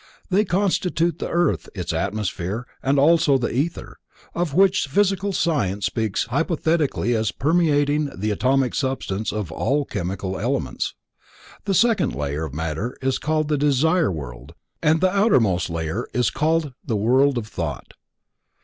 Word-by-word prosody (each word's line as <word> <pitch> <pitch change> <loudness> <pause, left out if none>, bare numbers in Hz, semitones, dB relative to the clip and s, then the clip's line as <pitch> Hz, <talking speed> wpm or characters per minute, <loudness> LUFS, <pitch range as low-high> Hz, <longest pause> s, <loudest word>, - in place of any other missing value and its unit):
They 205 +3 +3
constitute 180 -3 0
the - - -3
earth, 175 +1 0
its 90 -3 -3
atmosphere, 100 +4 -2 0.2
and 140 +1 +1
also 150 -1 +4
the 120 - -2
ether, 150 +8 -3 0.3
of 170 -4 -2
which 190 -3 +4
physical 195 +5 +1
science 105 - 0
speaks 110 -3 -1
hypothetically 150 - 0
as 110 -2 0
permeating 150 -1 +1
the 105 +3 -2
atomic 130 +4 +1
substance 120 -6 -2
of 105 -6 -4
all 140 - 0
chemical 95 -1 -4
elements. - - -2 0.7
The 195 -2 +1
second 215 - +2
layer 75 +2 -2
of 75 - -8
matter 80 +9 -3
is 135 0 0
called 155 0 0
the 150 -2 0
Desire 150 - +2
World 65 -6 -8 0.3
and 160 +1 +3
the 185 +1 +2
outermost 115 - +3
layer 85 +7 -3
is 120 -4 +2
called 155 -2 0
the 110 - -1
World 130 +6 +3
of 115 - -2
Thought. 80 -8 -5
135 Hz, 145 wpm, -22 LUFS, 100-165 Hz, 0.7 s, also